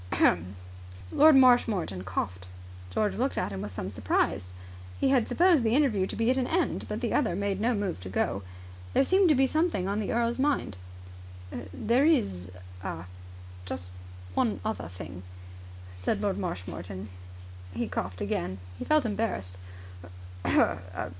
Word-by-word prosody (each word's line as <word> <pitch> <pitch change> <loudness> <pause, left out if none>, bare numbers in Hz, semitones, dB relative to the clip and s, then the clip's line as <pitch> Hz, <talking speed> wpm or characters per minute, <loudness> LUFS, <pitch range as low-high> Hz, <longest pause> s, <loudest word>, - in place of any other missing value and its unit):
Lord 310 0 +7
Marshmoreton 230 - +4
coughed. 90 -1 -3 0.4
George 205 - 0
looked 260 +4 0
at 105 - -1
him 95 -1 -4
with 105 0 -5
some 95 +1 -5
surprise. 90 0 0 0.5
He 270 - +3
had 255 -4 +3
supposed 345 -6 +4
the 225 +1 +2
interview 230 -10 +3
to - - -5
be 230 +2 +2
at 260 - +1
an 250 - 0
end, 350 +2 0
but - - -4
the - - -1
other 220 -11 +2
made 200 0 -1
no 235 +2 +2
move 200 - -2
to 95 +1 -8
go. 95 +1 0 0.5
There - - +5
seemed 375 +4 +4
to 305 - +5
be 265 +1 +4
something 310 - +1
on 200 +2 -1
the 215 - -2
earl's 235 +1 0
mind. 285 - +1 1.0
"There 235 - +2
is 95 - +1 0.3
ah 85 -3 -5 0.6
just 90 0 -5 0.4
one 220 - +1
other 220 - -2
thing," 90 +1 -9 0.8
said 200 - 0
Lord 205 -2 -1
Marshmoreton. 95 - -5 0.6
He - - -2
coughed 90 0 -4
again. 95 -2 -2 0.2
He - - -4
felt 305 -3 +3
embarrassed. 195 - -2
200 Hz, 150 wpm, -28 LUFS, -, 1.0 s, Lord